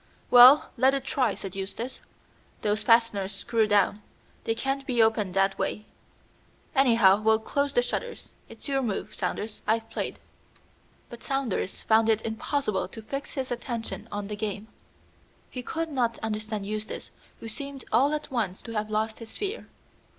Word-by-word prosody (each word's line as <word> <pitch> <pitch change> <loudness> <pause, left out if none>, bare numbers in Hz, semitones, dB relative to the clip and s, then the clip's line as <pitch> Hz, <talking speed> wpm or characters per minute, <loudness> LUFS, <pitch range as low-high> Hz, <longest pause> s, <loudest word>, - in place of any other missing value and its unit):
"Well, 250 +4 +9
let 265 +3 +4
it 275 - -2
try," 255 -7 0
said 195 -1 -7
Eustace. 205 +6 -5 0.6
"Those 210 0 +1
fasteners 215 -3 +3
screw 220 +2 +1
down; 205 0 +2 0.4
they 225 - 0
can't 270 +3 -2
be 245 -2 0
opened 220 -4 +3
that 195 0 +2
way. 210 - -2 0.9
Anyhow, 230 -7 +5
we'll 220 0 +4
close 280 +5 -1
the 245 - +3
shutters. 475 - -4 0.2
It's - - -11
your 270 -1 +1
move, 215 -6 -3
Saunders. 215 0 -4
I've 225 +1 +1
played." - - -3 0.9
But 235 - -9
Saunders 270 -8 -2
found 220 0 +4
it 220 0 +2
impossible 220 -3 -1
to 220 +4 -10
fix 275 +5 -5
his 265 -2 -3
attention 235 -1 -4
on 205 0 -3
the 210 - -4
game. 210 0 -4 0.8
He 250 - -5
could 325 +6 -3
not 245 -5 0
understand 215 -1 -3
Eustace, 215 +2 -5 0.3
who - - -8
seemed 275 +4 -7
all 265 +6 +4
at 300 -2 -4
once 210 -7 -2
to 230 - -8
have 215 -1 -2
lost 220 +1 -1
his 230 -1 -10
fear. 415 +2 -4
225 Hz, 160 wpm, -27 LUFS, 210-260 Hz, 0.9 s, Well